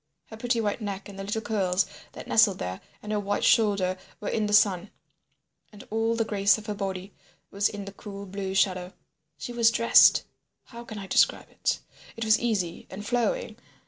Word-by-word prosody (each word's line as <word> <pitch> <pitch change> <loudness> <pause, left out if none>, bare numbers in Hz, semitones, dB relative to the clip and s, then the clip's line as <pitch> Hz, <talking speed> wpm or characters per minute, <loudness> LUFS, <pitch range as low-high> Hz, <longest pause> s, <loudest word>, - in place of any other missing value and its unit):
Her 220 - -8
pretty 240 +1 0
white 210 +1 -1
neck 200 -2 -5
and 195 -1 -10
the - - -4
little 215 +3 -3
curls 190 -4 +1 0.3
that - - -9
nestled - - +4
there, 90 +1 -5 0.2
and 210 - -5
her 210 - +1
white 205 0 -2
shoulder 200 -4 +3 0.2
were 210 - -4
in 215 -1 0
the - - -3
sun, 205 -2 +3 0.8
and 210 - -12
all 225 +1 +1
the 225 -1 0
grace 200 -1 +3
of 215 - -10
her 210 - -3
body 195 -1 -5 0.4
was 200 +1 +1
in 205 -1 -7
the 200 - -7
cool 200 0 -9
blue 190 0 -5
shadow. 185 -1 +1 0.4
She 245 - -6
was 235 -1 +4
dressed—how 235 +1 +2
can 220 -2 -8
I 200 - -6
describe - - +2
it? - - -1 0.4
It 230 - -3
was 220 0 +4
easy 200 -8 -2
and 205 +2 -8
flowing. 245 - -1
205 Hz, 190 wpm, -27 LUFS, 195-220 Hz, 0.8 s, nestled